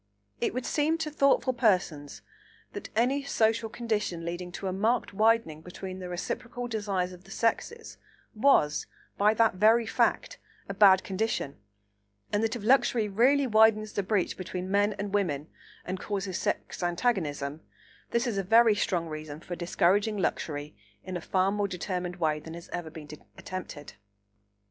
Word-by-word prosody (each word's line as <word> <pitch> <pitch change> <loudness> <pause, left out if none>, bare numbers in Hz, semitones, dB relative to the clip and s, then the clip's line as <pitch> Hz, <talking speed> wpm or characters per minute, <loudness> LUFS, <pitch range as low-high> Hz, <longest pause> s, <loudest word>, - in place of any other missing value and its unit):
It - - -1
would 255 - -3
seem 310 +2 +1
to 320 -2 -3
thoughtful 275 -2 +3
persons 180 - 0 0.5
that - - -7
any 255 +5 +2
social 225 -4 +1
condition 210 -8 -2
leading 175 +1 -5
to 195 - -6
a 185 - -1
marked 220 +4 0
widening 215 -7 +2
between 185 +2 -8
the 180 -1 -6
reciprocal 245 +7 -4
desires 200 -5 -2
of 180 0 -13
the 195 - -18
sexes 340 - -2 0.3
was, 215 - +3 0.3
by 210 +2 +4
that 225 -4 +3
very 225 +3 +5
fact, - - 0 0.3
a 200 - -4
bad 195 -2 +6
condition, 195 -7 -2 0.8
and 205 - +2
that 225 +2 0
if 230 - -6
luxury 235 -2 +3
really 260 +8 +3
widens 215 -2 +4
the - - 0
breach 195 -1 -1
between 185 0 -5
men 205 +1 +3
and 200 0 -5
women 160 -7 -1 0.4
and 185 - -4
causes 195 -3 -3
sex - - -3
antagonism, 170 - -1 0.5
this 235 +2 0
is 225 -5 -1
a - - -1
very 225 +3 +5
strong 185 -4 0
reason 155 -1 -7
for 175 +1 -6
discouraging 195 +5 +1
luxury 150 -5 -2 0.3
in 185 -1 -6
a 175 - -3
far 190 +3 +1
more 205 0 0
determined 180 -1 -4
way 155 -4 0
than 160 +2 -9
has 170 - -11
ever 175 -2 -5
been 155 -1 -10 0.3
attempted. 180 -6 -7
200 Hz, 160 wpm, -28 LUFS, 175-225 Hz, 0.8 s, bad